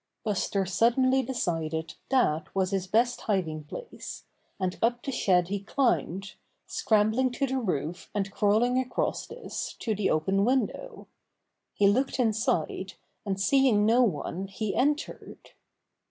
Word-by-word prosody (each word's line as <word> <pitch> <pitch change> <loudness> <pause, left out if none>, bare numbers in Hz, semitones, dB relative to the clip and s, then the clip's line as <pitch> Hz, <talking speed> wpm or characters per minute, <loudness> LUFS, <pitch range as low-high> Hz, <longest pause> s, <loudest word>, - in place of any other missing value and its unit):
Buster 200 -2 0
suddenly 250 +7 +3
decided 165 -10 -2 0.2
that 180 - +1
was 190 0 +1
his 190 -1 -1
best 235 +5 +2
hiding 165 -8 -1
place, 465 - -8 0.3
and 185 -1 -1
up 240 +1 +1
the 275 - -3
shed 180 -8 +2
he 200 0 -1
climbed, 195 - 0 0.3
scrambling 255 - +2
to 275 - 0
the 265 0 -1
roof 175 - -3
and 195 -1 -1
crawling 225 +5 +2
across 255 -1 -2
this 470 +2 -6
to 225 - -1
the 205 -1 0
open 190 +6 +2
window. 265 - -1 0.7
He 200 - +4
looked 260 +7 +1
inside, 225 -2 0 0.3
and 195 -1 -1
seeing 235 -1 +4
no 230 +3 +5
one 190 -2 -1
he 200 +1 -3
entered. 295 +4 -2
210 Hz, 135 wpm, -28 LUFS, 190-255 Hz, 0.7 s, no